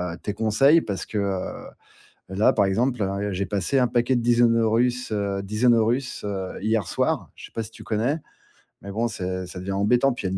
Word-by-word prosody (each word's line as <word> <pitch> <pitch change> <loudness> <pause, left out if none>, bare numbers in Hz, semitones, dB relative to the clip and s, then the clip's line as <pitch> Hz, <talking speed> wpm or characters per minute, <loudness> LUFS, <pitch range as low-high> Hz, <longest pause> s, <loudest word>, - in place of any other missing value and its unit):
heu, - - -13
tes 105 - -2
conseils 135 +10 +4
parce 100 -8 -4
que, 110 - -5
heu, 95 -2 -3 0.6
là 95 +3 +3
par 100 -2 +2
exemple 120 +4 0
hein, 100 0 -1
heu, 100 0 -2
j'ai 95 +1 -2
passé 100 +7 0
un 125 - +3
paquet 120 +2 +1
de 120 - 0
Dinosaurus 120 +1 +2
heu, 100 -2 -1
Dinosaurus 115 +4 +1
heu, 95 -2 -4
hier 110 -2 +1
soir, - - -1
je - - -10
sais - - -20
pas 115 - -3
si 110 - -10
tu - - -12
connais. 120 +8 0 0.6
Mais 100 - -8
bon, 115 +4 0
c'est 95 -4 -4
ça 90 - -8
devient 95 +2 -4
embêtant, 120 +7 +3
puis 120 - -7
il 95 - -3
y - - -3
a - - -1
110 Hz, 220 wpm, -24 LUFS, 100-120 Hz, 0.6 s, conseils